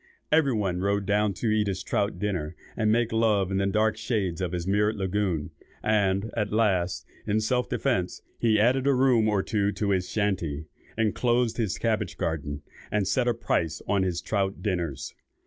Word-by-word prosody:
Everybody 110 - +2
rode 100 +1 0
down 105 0 +1
to 110 +4 -1
eat 105 -1 +2
his 95 -2 -2
trout, 100 +1 0
and 95 +3 -2
make 115 0 +2
love 105 -4 +2
in 95 - 0
the 100 0 +1
dark 110 +2 +1
shades 105 -6 -1
of 90 -2 -1
his 90 -2 -3
mirrored 105 +3 +2
lagoon; 95 -5 -1 0.3
and, 105 0 +1
at 105 -2 -1
last, 95 -5 +1 0.2
in 105 +1 +2
self 125 +3 0
defence, 100 -10 -1 0.2
he 110 -2 +3
added 130 +5 +3
a 140 - +4
room 125 -4 +4
or 100 -2 +1
two 100 -2 0
to 105 -2 -1
his 90 -2 0
shanty, 90 -8 -1 0.3
enclosed 120 +1 +1
his 110 -6 -1
cabbage 110 -5 -1
garden, 75 -4 -3 0.3
and 105 -2 +1
set 120 +6 +1
a 120 - +3
price 85 -8 -1
on 100 -1 +2
his 90 -2 -1
trout 100 -2 -1
dinners. 85 - -2
105 Hz, 175 wpm, -27 LUFS, 95-110 Hz, 0.3 s, a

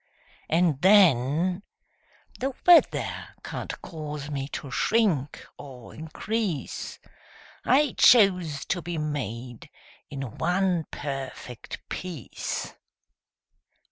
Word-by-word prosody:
And, 165 -4 +2
then, 180 - +4 0.8
The 265 0 -2
weather 350 -1 +4
can't - - -6
cause 150 -3 -6
me 135 -1 -3
to 140 -1 -7
shrink 175 - +1
or 130 -4 -11
increase: 175 +2 -4 0.7
I 280 +1 +3
chose 180 - +5
to 180 - -1
be 170 0 -4
made 125 -6 -5 0.4
in 135 -5 -7
one 180 -1 +1
perfect 135 -4 -7
piece! 175 -9 -5
155 Hz, 85 wpm, -26 LUFS, 140-185 Hz, 0.8 s, chose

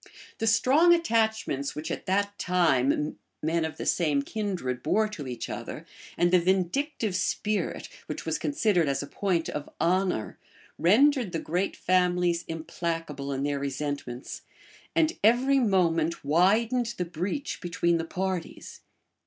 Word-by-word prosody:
The 225 - 0
strong 285 +10 +5
attachments, 220 - 0
which, 155 +2 -5
at - - -5
that 200 +2 0
time, 150 -5 +1 0.2
men 165 +1 +1
of 160 0 -4
the - - -5
same 150 -5 +1
kindred 180 - -3
bore 215 - +2
to 155 -10 -7
each 125 -2 -5
other, - - -6 0.3
and 175 0 +3
the 180 - +6
vindictive 190 - 0
spirit, 210 +3 -1 0.2
which - - -5
was - - -1
considered 215 - +1
as 140 0 0
a - - -5
point 175 +1 -1
of 150 -1 -5
honor, 180 - 0 0.4
rendered 240 - +4
the 165 - -1
great 180 +6 -1
families 180 -1 +1
implacable 165 -3 -4
in 135 0 -2
their 145 -1 -1
resentments, 140 -2 -4 0.5
and 325 0 +2
every 255 +5 +4
moment 170 - +1
widened 225 - +2
the 180 - -1
breach 185 - -4
between 170 -1 +1
the - - -1
parties. 185 0 -4
180 Hz, 140 wpm, -27 LUFS, 155-215 Hz, 0.5 s, the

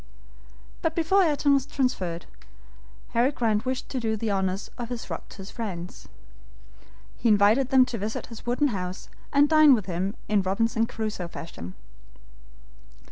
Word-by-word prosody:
But 320 -1 0
before 340 +4 +3
Ayrton 295 -4 +3
was 275 - +2
transferred, 185 -11 -1 0.8
Harry 240 +4 +2
Grant 225 -4 0
wished 260 0 -2
to 260 - -2
do 220 -2 -1
the 215 0 -1
honors 190 0 -1
of 240 -1 -5
his 245 -2 -6
rock - - -6
to - - -12
his 195 0 -9
friends. 185 -6 -6 1.1
He 235 - +1
invited 215 +5 +4
them 260 -2 +6
to 235 -3 -5
visit 210 +3 -3
his 230 -2 -11
wooden 250 +5 +1
house, 185 -4 -5 0.2
and 285 +1 +5
dine 310 -3 +7
with 210 -5 -3
him 190 +3 -2
in 210 -2 +3
Robinson 225 +4 +1
Crusoe 215 -6 -4
fashion. 95 - -8
225 Hz, 155 wpm, -26 LUFS, 195-260 Hz, 1.1 s, dine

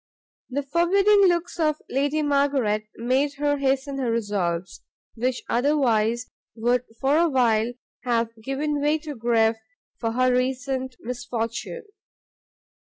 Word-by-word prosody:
The 280 +2 -2
forbidding 390 +7 +4
looks 345 0 0
of 305 -2 +1
Lady 285 +3 0
Margaret 275 -7 +1
made 265 +5 0
her 290 0 0
hasten 275 0 0
her 255 -3 0
resolves, 195 -6 -2 0.3
which 250 +2 -2
otherwise 240 -3 +1 0.2
would 245 +2 +1
for 275 +4 +3
a 340 0 +3
while 240 -4 +2 0.3
have 235 -2 0
given 285 +4 -2
way 300 +2 +2
to 305 -1 -7
grief 225 -2 +2 0.4
for 225 -1 -1
her 255 +1 +3
recent 260 0 -1
misfortune. 240 -1 -4
260 Hz, 120 wpm, -24 LUFS, 230-290 Hz, 0.4 s, forbidding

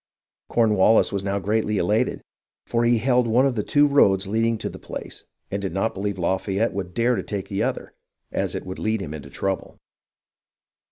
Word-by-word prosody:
Cornwallis 110 -2 +4
was 100 -1 -1
now 100 0 -1
greatly 105 +1 0
elated, 105 +5 0 0.4
for 120 0 0
he 120 0 +4
held 125 +1 +2
one 120 +4 +4
of 135 - +2
the 110 - -1
two 145 +7 +3
roads 100 -9 +4
leading 115 +3 +1
to - - -4
the - - -8
place - - -8 0.3
and 100 - -2
did 95 -2 -4
not 105 +4 0
believe 100 0 -3
Lafayette 95 +5 0
would 95 -2 -5
dare 120 +2 +2
to - - -1
take 100 -2 -5
the 100 - -2
other, - - -2 0.4
as - - -2
it - - -5
would 95 0 -6
lead 110 0 0
him 75 -6 -5
into 75 -2 -8
trouble. 95 -1 -3
105 Hz, 190 wpm, -23 LUFS, 95-115 Hz, 0.4 s, Cornwallis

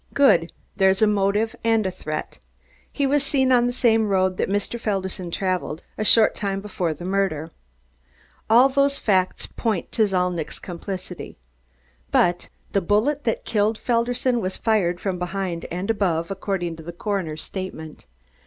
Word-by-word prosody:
Good! 175 -12 +4 0.3
There's 190 +1 +4
a - - +8
motive 210 +2 +1
and 225 -2 +2
a 190 - 0
threat. 155 -4 -6 0.5
He 285 - 0
was 280 +1 +2
seen 265 -2 +2
on 245 -1 +4
the - - 0
same 225 -3 +3
road 185 -2 +1
that - - 0
Mr. 205 +4 -2
Felderson 190 -4 -3
traveled, 180 -3 -2
a 215 - -2
short 220 +1 +6
time 195 -1 -2
before 185 -5 -2
the 175 - -8
murder. 185 -5 -1 1.0
All 240 +4 +7
those 280 +1 +2
facts 185 -3 +1
point 220 -7 -2
to 220 -2 +2
Zalnitch's 180 -4 -1
complicity. 185 0 -7 0.7
But 175 0 +2 0.2
the 200 - +2
bullet 230 - +1
that 225 - -1
killed 215 0 +1
Felderson 240 +1 0
was 185 -1 -3
fired 190 -6 +1
from 185 -2 -2
behind 180 -1 -3
and 180 +5 -1
above, 175 -5 0
according 185 -4 -3
to 160 - -10
the 170 +2 -7
coroner's 175 -5 -3
statement. 175 -5 -7
195 Hz, 155 wpm, -23 LUFS, 180-225 Hz, 1.0 s, a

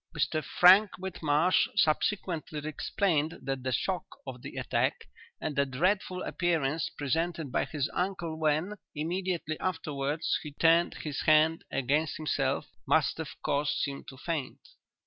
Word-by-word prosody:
"'Mr 155 +1 0
Frank 190 +9 +7
Whitmarsh 175 -2 +2
subsequently 160 -1 0
explained 155 0 0
that 135 -1 -2
the 130 +1 -2
shock 185 +7 -1 0.2
of 130 -2 -7
the - - -8
attack, - - -1 0.3
and 150 - -3
the 140 - +3
dreadful 180 +7 0
appearance 165 -4 0
presented 160 +1 -1
by - - +1
his 145 -3 -2
uncle 180 -3 -2
when, 155 +5 +1 0.2
immediately 170 0 -2
afterwards, 155 -4 -1
he 150 -2 -8
turned 165 +3 +3
his 150 -3 -3
hand 155 +1 +5
against 145 +4 0
himself, 155 -2 0 0.2
must - - +2
have - - -6
caused 145 +1 +1
him 140 0 -6
to 135 - -12
faint. 160 - -4
155 Hz, 135 wpm, -30 LUFS, 145-175 Hz, 0.3 s, Frank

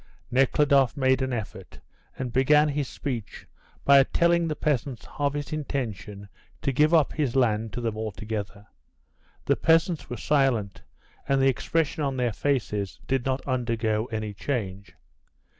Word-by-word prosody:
Nekhludoff 135 +1 +3
made 130 -1 +2
an 130 0 -1
effort, 115 -4 -6 0.4
and 125 -2 -4
began 150 +4 +4
his 145 -1 -2
speech 125 -8 -6 0.4
by 140 0 +8
telling 170 +4 +2
the 155 - -2
peasants 135 -5 -2
of 145 0 +1
his 145 +1 -4
intention 110 -9 -4 0.4
to 140 - +1
give 150 +4 +3
up 160 -4 +3
his 140 -6 -1
land 110 -4 +1
to 120 - -4
them 115 -2 -2
altogether. 105 -1 -5 0.8
The - - +3
peasants 165 -1 +2
were 120 - -4
silent, 115 -9 +1 0.5
and 135 0 +2
the 135 0 +4
expression 160 +4 -1
on 135 -2 -1
their 120 -3 0
faces 105 -7 -2
did 135 -1 -1
not 130 +1 -2
undergo 115 -4 0
any 110 -3 -4
change. 100 -3 -4
130 Hz, 145 wpm, -26 LUFS, 110-145 Hz, 0.8 s, by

